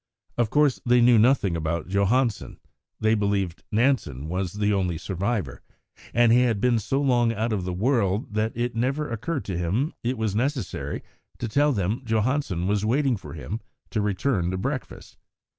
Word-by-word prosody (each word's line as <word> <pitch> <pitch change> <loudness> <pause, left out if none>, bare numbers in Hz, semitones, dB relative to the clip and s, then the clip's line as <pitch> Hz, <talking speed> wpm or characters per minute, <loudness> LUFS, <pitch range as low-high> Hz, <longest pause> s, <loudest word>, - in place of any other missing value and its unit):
Of 120 -3 +1
course 145 -1 +2
they 125 0 +4
knew 120 -1 +6
nothing 110 -6 +3
about 80 0 -2
Johansen; 105 +5 0 0.4
they 110 0 +3
believed 100 -5 0
Nansen 105 - +1
was 90 0 -2
the 105 0 +1
only 90 -4 0
survivor, 95 - -3 0.5
and 120 -1 +4
he 120 +2 +6
had 115 -5 +1
been 120 0 +2
so 135 +6 -1
long 120 -4 +3
out 110 +1 -1
of 95 -4 -2
the 90 - -2
world 105 -1 0
that 110 +1 0
it 120 +1 -1
had - - -19
never 135 +6 0
occurred 125 +6 -3
to 95 -4 -3
him 105 - 0
it 125 +2 -1
was 110 -3 -1
necessary 125 - -2 0.3
to 120 - -3
tell 145 +6 +3
them 105 +1 -1
Johansen 110 - 0
was 100 +1 +1
waiting 130 +3 +2
for 100 - -9
him 100 +8 -5 0.3
to 110 - 0
return 100 -2 0
to 95 - -2
breakfast. 95 - -5
110 Hz, 175 wpm, -25 LUFS, 95-125 Hz, 0.5 s, knew